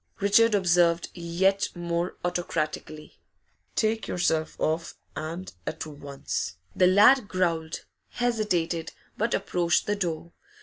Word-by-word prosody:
Richard 210 +2 +4
observed, 175 -3 +3
yet 185 +3 +1
more 170 0 -2
autocratically. 155 -3 -3 0.6
'Take 220 0 0
yourself 160 -3 0
off, 160 +1 -1 0.2
and 165 +4 -5
at 160 - -4
once!' 140 - -5 0.2
The 180 - +5
lad 210 +5 +6
growled, 170 -4 -1 0.2
hesitated, 185 -9 -1 0.2
but 230 +2 0
approached 175 -3 +1
the 205 - 0
door. 170 -4 -3
175 Hz, 105 wpm, -27 LUFS, 165-200 Hz, 0.6 s, lad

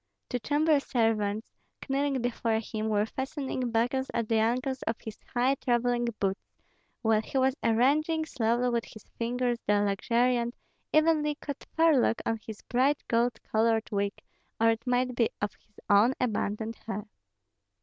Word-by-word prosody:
Two 250 - -1
chamber 295 +3 +2
servants, 225 -5 0 0.3
kneeling 275 -2 0
before 230 -2 0
him, 220 0 -3
were 210 -1 +2
fastening 265 0 -3
buckles 245 +4 0
at 230 -2 0
the 225 0 +2
ankles 255 +4 0
on 225 - +1
his 220 -1 -8 0.2
high 250 +3 +3
travelling 240 -2 +1
boots, 195 0 0 0.6
while 220 -1 +3
he 270 - -4
was 265 0 +3
arranging 295 +8 +2
slowly 240 -3 0
with 235 -1 0
his 220 - -13 0.2
fingers 240 +1 0
the 205 0 +4
luxuriant, 235 +4 +1 0.4
evenly 310 -1 +3
cut 285 -1 -7
forelock 310 -8 +4
of 225 -1 0
his 215 -2 -9
bright 265 +4 +2
gold 235 +1 +1
colored 225 0 +1
wig, 200 -1 0 0.5
or 225 0 +5
it 225 +2 -4
might 250 0 +1
be 235 -2 +2
of 205 0 -2
his 210 - -23
own 215 +6 +5
abundant 220 -1 -1
hair. 210 -1 -4
235 Hz, 150 wpm, -29 LUFS, 220-265 Hz, 0.6 s, or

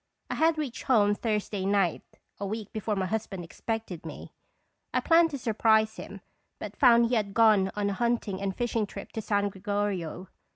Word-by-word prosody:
I - - 0
had 320 0 +2
reached 285 -6 -4
home 205 -5 +4
Thursday 210 -2 -2
night, 195 -3 +1 0.4
a 200 - -3
week 215 0 -5
before 215 -1 -2
my 190 -1 -1
husband 200 -2 -3
expected 205 0 -5
me. - - -9 0.6
I - - +4
planned 330 0 +4
to 285 - -4
surprise 220 -2 +2
him, - - -9 0.4
but - - -7
found 235 -4 +6
he - - -2
had 200 -3 -1
gone 215 -4 +5
on 205 -1 0
a - - -2
hunting 230 -3 -1
and 195 -1 -2
fishing 230 -3 -1
trip - - -9
to 220 - -4
San 205 -1 0
Gregorio. 195 -3 -3
210 Hz, 180 wpm, -28 LUFS, 200-230 Hz, 0.6 s, found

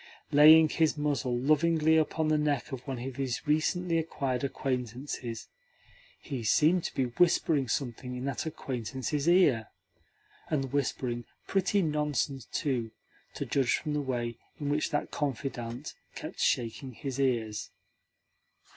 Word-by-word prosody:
Laying 155 +2 +8
his 160 -1 +1
muzzle 135 -5 0
lovingly 155 +4 +3
upon 160 0 +1
the 155 - +3
neck 150 -1 0
of 130 -2 -5
one 135 -2 -3
of 130 +2 -6
his 135 -2 -2
recently 165 +3 +1
acquired 135 -5 -2
acquaintances, 125 -2 -3 0.7
he 130 -4 -5
seemed 155 - +4
to - - -4
be 135 - +2
whispering 145 +1 +2
something 125 0 -3
in 125 +1 -4
that 140 +4 -2
acquaintance's 135 - -2
ear 140 - +4 0.8
and 135 -3 -1
whispering 125 -4 -1 0.2
pretty 195 +1 +1
nonsense, 150 -4 -1
too, 125 -6 -2 0.5
to - - -3
judge 135 -4 +2
from 150 -2 -3
the 150 - 0
way 120 -4 -3 0.2
in 145 -2 -2
which 150 +1 +1
that 145 -2 -2
confidant 130 -2 -4 0.2
kept - - -7
shaking 125 +3 0
his 135 +1 -5
ears. 115 -5 0
140 Hz, 135 wpm, -30 LUFS, 125-150 Hz, 0.8 s, Laying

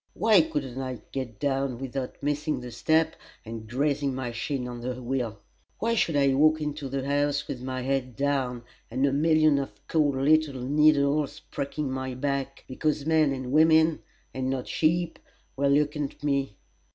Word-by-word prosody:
Why 215 -5 +5
couldn't 140 -5 -3
I 130 -1 -4
get 130 -5 -5
down 135 -3 0
without 135 +1 -5
missing 150 +1 -1
the 125 -1 -8
step 160 +6 +2 0.3
and 110 -1 -7
grazing 140 +1 0
my 125 -2 -3
shin 125 +2 -3
on 120 -1 -7
the 125 +1 -4
wheel? 120 -3 -2 0.4
Why 230 +1 0
should 170 -8 +1
I 140 -1 +4
walk 155 +3 +4
into 150 -2 -4
the 135 0 -3
house 145 +1 0
with 125 - -5
my 130 0 -4
head 130 -2 -1
down, 135 -3 -1 0.3
and 130 +2 +1
a 135 - +1
million 155 0 +4
of 135 - -3 0.2
cold 150 -4 +2
little 145 0 +2
needles 145 +1 +2
pricking 140 0 -3
my 130 -1 -3
back, 135 0 -3
because 145 +2 -1
men 160 -2 +3
and 130 -2 -4
women, 160 +1 +5 0.3
and 130 0 -2
not 130 -1 -2
sheep, 165 +1 0 0.4
were 140 +1 +1
looking 145 +1 +2
at 140 - -10
me? 140 -6 0
140 Hz, 170 wpm, -27 LUFS, 130-150 Hz, 0.4 s, Why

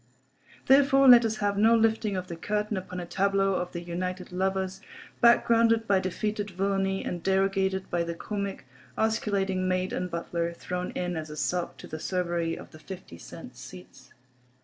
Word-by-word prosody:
Therefore 275 0 +5
let 240 -2 +9
us 220 -1 0
have 205 -1 -1
no 225 +2 +6
lifting 220 -3 +1
of 185 - -3
the 170 - -6
curtain 210 +4 -2
upon 185 -1 -5
a 175 - -5
tableau 195 +2 +1
of 180 -1 -2
the 170 - -5
united 180 +1 -4
lovers, 190 +1 -1 0.4
backgrounded 230 -1 +4
by 195 -1 +4
defeated 205 +3 -2
villainy 195 +1 -1
and 175 - -4
derogated 190 0 +1
by 175 - +1
the 170 0 -3
comic, 200 -3 -4 0.3
osculating 195 -4 0
maid 185 0 0
and 180 - -2
butler, 170 0 -3
thrown 180 +1 -4
in 180 0 -2
as 155 -1 -5
a 150 - -8
sop 175 +3 -2
to - - -10
the 155 - -6
Cerberi 170 -2 -1
of - - -11
the 155 - -13
fifty 155 - -10
cent - - -11
seats. - - -13
190 Hz, 170 wpm, -27 LUFS, 180-210 Hz, 0.4 s, let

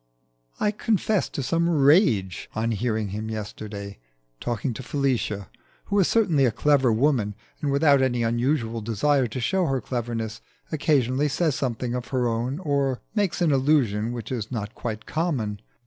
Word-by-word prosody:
I 210 - +2
confess 215 -1 0
to 140 - -4
some 170 +5 +1
rage 135 - +3
on 115 +1 0
hearing 110 -1 -1
him 105 +3 -4
yesterday 105 - -6 0.4
talking 120 +1 -2
to 120 - -7
Felicia, 125 - -1 0.4
who 200 - +1
is 190 - +4
certainly 175 -12 +3
a 120 - +3
clever 135 0 +3
woman, 115 -4 +1 0.3
and, 145 - 0
without 140 -1 +4
any 120 -2 +1
unusual 115 0 0
desire 125 +5 +1
to 115 +3 -5
show 180 +9 +1
her 135 -1 0
cleverness, 115 -3 -4 0.3
occasionally 140 -3 +2
says 155 +1 +1
something 125 -2 -2
of 125 -1 -3
her 125 -2 0
own 120 +4 -1
or 140 -6 0
makes 200 -5 0
an 160 - +3
allusion 130 -6 +2
which 120 0 -6
is 115 -3 -3
not 105 -3 -4
quite 110 -3 -5
common. 125 - -2
125 Hz, 160 wpm, -25 LUFS, 110-145 Hz, 0.4 s, is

